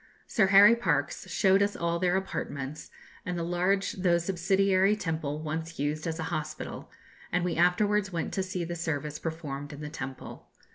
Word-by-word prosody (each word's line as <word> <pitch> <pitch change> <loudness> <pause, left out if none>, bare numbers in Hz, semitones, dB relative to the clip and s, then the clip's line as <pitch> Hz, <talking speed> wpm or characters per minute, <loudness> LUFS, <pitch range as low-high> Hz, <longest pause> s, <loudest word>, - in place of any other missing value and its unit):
Sir 215 -5 +2
Harry 200 +4 +8
Parkes 235 - -1
showed 195 0 +3
us 200 0 +1
all 170 0 -1
their 180 +1 +2
apartments, 145 -6 -5 0.3
and 180 -1 -3
the 170 - -2
large 180 +3 +1
though 180 -2 +2
subsidiary 190 +3 +2
temple 155 -5 -3
once 160 +2 -4
used 150 +3 -2
as 160 -1 -2
a 160 - -3
hospital, 155 -1 -5 0.4
and 180 0 +1
we 175 - -1
afterwards 195 +4 +2
went 170 -2 -3
to 190 - 0
see 185 -2 -3
the 170 +1 -4
service 150 -3 -3
performed 145 -3 -5
in 145 0 -9
the 150 - -5
temple. 130 -3 -8
170 Hz, 175 wpm, -29 LUFS, 155-190 Hz, 0.4 s, Harry